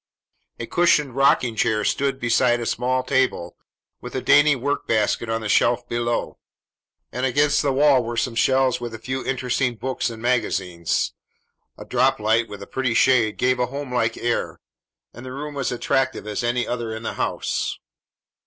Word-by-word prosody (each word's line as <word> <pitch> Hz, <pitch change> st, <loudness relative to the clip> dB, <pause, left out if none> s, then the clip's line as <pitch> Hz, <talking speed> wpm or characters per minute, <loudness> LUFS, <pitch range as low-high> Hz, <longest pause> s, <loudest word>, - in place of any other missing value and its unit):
A 115 Hz, -, -4 dB
cushioned 150 Hz, -4 st, +2 dB
rocking 125 Hz, -3 st, +3 dB
chair 110 Hz, -1 st, +1 dB
stood 135 Hz, -1 st, 0 dB
beside 120 Hz, 0 st, +2 dB
a 120 Hz, -, -4 dB
small 125 Hz, +3 st, 0 dB
table, 130 Hz, -10 st, 0 dB, 0.5 s
with -, -, -8 dB
a -, -, -1 dB
dainty 145 Hz, 0 st, +5 dB
work 140 Hz, +3 st, -2 dB
basket 110 Hz, +1 st, 0 dB
on 115 Hz, 0 st, -1 dB
the 110 Hz, -, -4 dB
shelf 120 Hz, +3 st, +2 dB
below; 120 Hz, 0 st, -2 dB, 0.7 s
and 125 Hz, -, -4 dB
against 145 Hz, +3 st, +2 dB
the 140 Hz, -, +1 dB
wall 135 Hz, -1 st, +4 dB
were 115 Hz, 0 st, -5 dB
some 120 Hz, +1 st, 0 dB
shelves 130 Hz, +1 st, +2 dB
with 120 Hz, -2 st, -5 dB
a -, -, -6 dB
few 130 Hz, +4 st, -4 dB
interesting 125 Hz, -1 st, -1 dB
books 130 Hz, +2 st, -2 dB
and 115 Hz, -1 st, -8 dB
magazines. 95 Hz, -8 st, -1 dB, 0.6 s
A -, -, -10 dB
droplight 115 Hz, -3 st, +1 dB
with 100 Hz, -1 st, -8 dB
a -, -, -9 dB
pretty 130 Hz, -3 st, -1 dB
shade 115 Hz, -5 st, +3 dB
gave 125 Hz, 0 st, +1 dB
a 125 Hz, -, +1 dB
home 140 Hz, 0 st, -6 dB
like 115 Hz, -2 st, 0 dB
air, 120 Hz, 0 st, -2 dB, 0.5 s
and 120 Hz, -, -11 dB
the 130 Hz, 0 st, -7 dB
room 150 Hz, +2 st, -6 dB
was 140 Hz, -2 st, -2 dB
as -, -, -2 dB
attractive 130 Hz, -3 st, -1 dB
as 105 Hz, +2 st, -3 dB
any 120 Hz, +1 st, 0 dB
other 120 Hz, -2 st, -3 dB
in 110 Hz, -, -8 dB
the -, -, -3 dB
house. -, -, -2 dB
125 Hz, 180 wpm, -22 LUFS, 115-130 Hz, 0.7 s, dainty